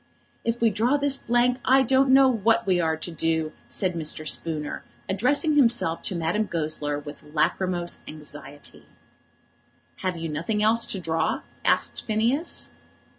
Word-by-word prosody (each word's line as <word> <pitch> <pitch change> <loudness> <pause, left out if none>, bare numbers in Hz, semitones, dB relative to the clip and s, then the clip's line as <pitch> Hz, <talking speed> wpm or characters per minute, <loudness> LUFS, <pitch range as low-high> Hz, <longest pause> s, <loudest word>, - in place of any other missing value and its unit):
"If 230 0 -2
we 230 -1 +4
draw 235 +8 +2
this 285 -1 +2
blank 245 0 +1
I 265 +1 +5
don't 265 +2 +3
know 265 0 +7
what 225 -3 +2
we 185 -2 +2
are 160 -1 0
to 175 - -6
do," 160 -1 -1 0.2
said 185 -2 -1
Mr. 155 -1 -4
Spooner, 155 -3 -2 0.2
addressing 285 - +2
himself 235 - +3
to 185 - -3
Madame 175 +6 0
Goesler 155 -3 -2
with 145 0 -9
lachrymose 175 +3 -1
anxiety. 150 -1 -9 1.1
"Have 185 -2 -2
you 165 0 -4
nothing 170 +8 -1
else 230 +2 +3
to 195 - -4
draw?" 165 -2 -1 0.2
asked - - +1
Phineas. 235 +9 +1
190 Hz, 145 wpm, -25 LUFS, 160-240 Hz, 1.1 s, know